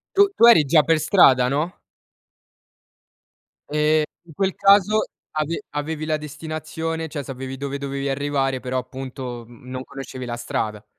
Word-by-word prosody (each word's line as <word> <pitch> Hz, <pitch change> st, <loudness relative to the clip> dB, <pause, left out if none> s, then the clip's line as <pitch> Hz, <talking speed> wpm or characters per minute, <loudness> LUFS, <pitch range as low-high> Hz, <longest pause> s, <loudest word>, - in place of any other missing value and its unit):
Tu 405 Hz, 0 st, +6 dB
tu 230 Hz, -, +6 dB
eri 160 Hz, -11 st, +7 dB
già 150 Hz, +2 st, +5 dB
per 165 Hz, -1 st, +3 dB
strada, 135 Hz, -7 st, +5 dB
no? 150 Hz, +6 st, -2 dB, 1.9 s
Ehm, 150 Hz, +1 st, +3 dB, 0.2 s
in 165 Hz, -3 st, -15 dB
quel 190 Hz, +3 st, -1 dB
caso, 200 Hz, +2 st, +4 dB, 0.3 s
ave 155 Hz, +5 st, -2 dB
avevi 155 Hz, +1 st, -3 dB
la 155 Hz, -1 st, 0 dB
destinazione 155 Hz, +2 st, -5 dB
cioè, 145 Hz, -2 st, -5 dB
sapevi 130 Hz, 0 st, -6 dB
dove 140 Hz, +1 st, -4 dB
dovevi 140 Hz, 0 st, -3 dB
arrivare, 135 Hz, -1 st, -1 dB
però, 130 Hz, 0 st, -2 dB
appunto, 125 Hz, -1 st, -7 dB
mhmm, 120 Hz, +1 st, -15 dB
non 130 Hz, 0 st, -5 dB
conoscevi 130 Hz, -2 st, -8 dB
la 120 Hz, -1 st, -4 dB
strada. 105 Hz, -2 st, -3 dB
145 Hz, 150 wpm, -22 LUFS, 130-160 Hz, 1.9 s, eri